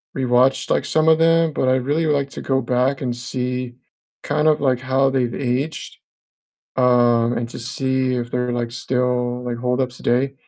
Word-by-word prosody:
re-watched, 130 Hz, 0 st, +2 dB
like, -, -, +1 dB
some 160 Hz, 0 st, +2 dB
of 160 Hz, 0 st, +4 dB
them, 165 Hz, 0 st, +3 dB
but 130 Hz, -, -1 dB
I'd 130 Hz, -1 st, +1 dB
really 155 Hz, +3 st, 0 dB
like 140 Hz, -2 st, 0 dB
to -, -, -7 dB
go 135 Hz, 0 st, 0 dB
back 125 Hz, +2 st, 0 dB
and 125 Hz, -3 st, -2 dB
see 125 Hz, 0 st, -4 dB, 0.5 s
kind 150 Hz, +1 st, 0 dB
of 155 Hz, -2 st, +3 dB
like 130 Hz, -3 st, +1 dB
how 130 Hz, +1 st, +1 dB
they've 125 Hz, -3 st, -1 dB
aged, 135 Hz, +4 st, -3 dB, 0.8 s
um, 120 Hz, -2 st, +3 dB
and 120 Hz, 0 st, -4 dB
to -, -, -8 dB
see 130 Hz, +1 st, -1 dB
if 120 Hz, -1 st, -4 dB
they're, 125 Hz, 0 st, -1 dB
like 120 Hz, -1 st, -3 dB
still, 125 Hz, 0 st, -1 dB
like, 120 Hz, -1 st, -3 dB
hold 125 Hz, +1 st, -1 dB
up 130 Hz, -1 st, 0 dB
today. 130 Hz, +2 st, -1 dB
125 Hz, 185 wpm, -20 LUFS, 125-135 Hz, 0.8 s, of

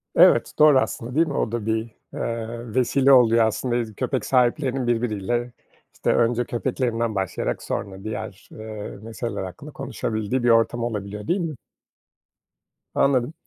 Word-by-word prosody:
Evet, -, -, +5 dB
doğru 150 Hz, -3 st, +7 dB
aslında, 125 Hz, -1 st, -3 dB
değil 165 Hz, +2 st, +4 dB
mi? 145 Hz, -, -3 dB
O 110 Hz, -, -1 dB
da 115 Hz, -3 st, -3 dB
bir, 110 Hz, 0 st, +1 dB, 0.4 s
eee, 115 Hz, 0 st, -4 dB
vesile 130 Hz, +2 st, +3 dB
oluyor 115 Hz, -3 st, +6 dB
aslında, 120 Hz, +3 st, -1 dB
iz 115 Hz, -3 st, -2 dB
köpek 130 Hz, +5 st, -2 dB
sahiplerinin 130 Hz, 0 st, +1 dB
birbiriyle. 120 Hz, 0 st, -1 dB, 0.4 s
İşte -, -, 0 dB
önce 120 Hz, +1 st, +2 dB
köpeklerinden 120 Hz, -2 st, -1 dB
başlayarak 95 Hz, -2 st, -2 dB
sonra 95 Hz, -1 st, -4 dB
diğer, 105 Hz, -2 st, -6 dB
eee, 110 Hz, -2 st, -7 dB
meseleler 115 Hz, -1 st, -5 dB
hakkında 95 Hz, +11 st, -8 dB
konuşabildiği 120 Hz, -3 st, -3 dB
bir 120 Hz, -, +3 dB
ortam 115 Hz, +1 st, +3 dB
olabiliyor, 105 Hz, -2 st, -4 dB
değil 185 Hz, -, +1 dB
mi? 165 Hz, -4 st, -3 dB, 1.4 s
Anladım. 130 Hz, 0 st, +2 dB
120 Hz, 145 wpm, -23 LUFS, 110-130 Hz, 1.4 s, doğru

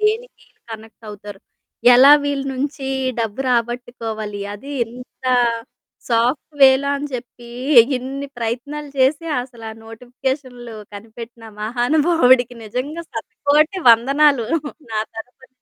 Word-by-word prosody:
దేనికి 440 Hz, +3 st, -1 dB
ఈళ్ళు -, -, -37 dB
కనెక్ట్ 220 Hz, +1 st, -12 dB
అవుతారు. 205 Hz, -1 st, -10 dB, 0.5 s
ఎలా 265 Hz, +4 st, +8 dB
వీళ్ళ 285 Hz, -1 st, -2 dB
నుంచి 275 Hz, +1 st, -4 dB, 0.3 s
డబ్బు 225 Hz, +2 st, -3 dB
రాబట్టుకోవాలి, 230 Hz, -3 st, -3 dB
అది 270 Hz, +8 st, -10 dB
ఇంత 250 Hz, +3 st, -14 dB, 0.8 s
సాఫ్ట్ 245 Hz, +6 st, 0 dB
వే‌లో 270 Hz, +1 st, +6 dB
అని 285 Hz, +1 st, -4 dB
చెప్పి, 240 Hz, -1 st, -9 dB, 0.5 s
ఇన్ని 270 Hz, +3 st, -5 dB
ప్రయత్నాలు 265 Hz, +6 st, -4 dB
చేసి 275 Hz, +5 st, +2 dB
అసల 245 Hz, -2 st, -8 dB
ఆ -, -, -8 dB
నోటిఫికేషన్లు 245 Hz, +1 st, -6 dB, 0.2 s
కనిపెట్టిన 225 Hz, +2 st, -11 dB, 0.2 s
మహానుభావుడికి 250 Hz, +1 st, +3 dB
నిజంగా 265 Hz, +10 st, -4 dB
శత 225 Hz, -2 st, -6 dB, 0.2 s
కోటి 305 Hz, +6 st, +3 dB
వందనాలు 275 Hz, +2 st, +4 dB, 0.5 s
నా 220 Hz, -, -2 dB, 0.2 s
తరుపుని. 250 Hz, +3 st, -11 dB
250 Hz, 110 wpm, -20 LUFS, 230-280 Hz, 0.8 s, ఎలా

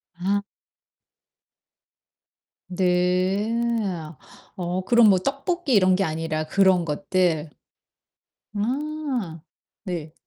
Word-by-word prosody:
아. 195 Hz, +4 st, 0 dB, 2.3 s
네. 185 Hz, +3 st, +1 dB, 1.0 s
어 180 Hz, 0 st, -2 dB
그럼 235 Hz, +1 st, +5 dB
뭐 190 Hz, -2 st, +4 dB
떡볶이 275 Hz, -, -2 dB
이런 185 Hz, -3 st, +5 dB
게 195 Hz, -, +1 dB
아니라 155 Hz, -2 st, -2 dB
그런 190 Hz, +1 st, +3 dB
것들. 165 Hz, -1 st, 0 dB, 1.0 s
아 250 Hz, -, -3 dB, 0.4 s
네. 165 Hz, -5 st, -5 dB
185 Hz, 125 characters per minute, -24 LUFS, 175-220 Hz, 2.3 s, 그럼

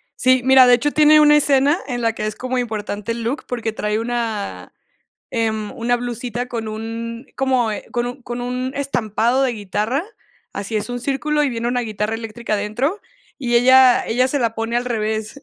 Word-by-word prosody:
Sí, 255 Hz, 0 st, +3 dB
mira, 265 Hz, -1 st, +7 dB
de 245 Hz, -, +7 dB
hecho, 290 Hz, +5 st, -1 dB
tiene 305 Hz, 0 st, +6 dB
una 295 Hz, 0 st, +6 dB
escena 285 Hz, +1 st, +4 dB
en 245 Hz, -2 st, -3 dB
la 230 Hz, -1 st, +1 dB
que 215 Hz, -, -4 dB
es 215 Hz, 0 st, -3 dB
como 255 Hz, 0 st, -3 dB
importante 210 Hz, -2 st, -3 dB
el 230 Hz, 0 st, -4 dB
look, 255 Hz, +6 st, -3 dB
porque 230 Hz, -3 st, -3 dB
trae 210 Hz, 0 st, -1 dB
una, 230 Hz, -3 st, -4 dB, 0.6 s
em, 220 Hz, -3 st, -2 dB
una 245 Hz, -1 st, 0 dB
blusita 240 Hz, 0 st, -4 dB
con 230 Hz, -3 st, -5 dB
un 230 Hz, +3 st, -6 dB
como, 260 Hz, -4 st, +1 dB
eh -, -, -6 dB
con 240 Hz, 0 st, -1 dB
un 250 Hz, +2 st, -7 dB
con 240 Hz, 0 st, -5 dB
un 250 Hz, +1 st, -3 dB
estampado 245 Hz, -2 st, 0 dB
de 260 Hz, -, +1 dB
guitarra, 215 Hz, -, -2 dB, 0.5 s
así 200 Hz, +2 st, -4 dB
es 210 Hz, -, -2 dB
un 245 Hz, 0 st, -4 dB
círculo, 295 Hz, +4 st, 0 dB
y 285 Hz, -, +2 dB
viene 235 Hz, -1 st, -3 dB
una 245 Hz, 0 st, 0 dB
guitarra 215 Hz, -1 st, -3 dB
eléctrica 225 Hz, 0 st, -6 dB
adentro, 240 Hz, -, -1 dB, 0.4 s
y 240 Hz, -1 st, 0 dB
ella 255 Hz, +1 st, +6 dB
ella 255 Hz, +3 st, +2 dB
se 285 Hz, -, 0 dB
la 230 Hz, -3 st, 0 dB
pone 225 Hz, +1 st, -2 dB
al 245 Hz, -, 0 dB
revés. 220 Hz, +1 st, -3 dB
240 Hz, 195 wpm, -20 LUFS, 225-255 Hz, 0.6 s, mira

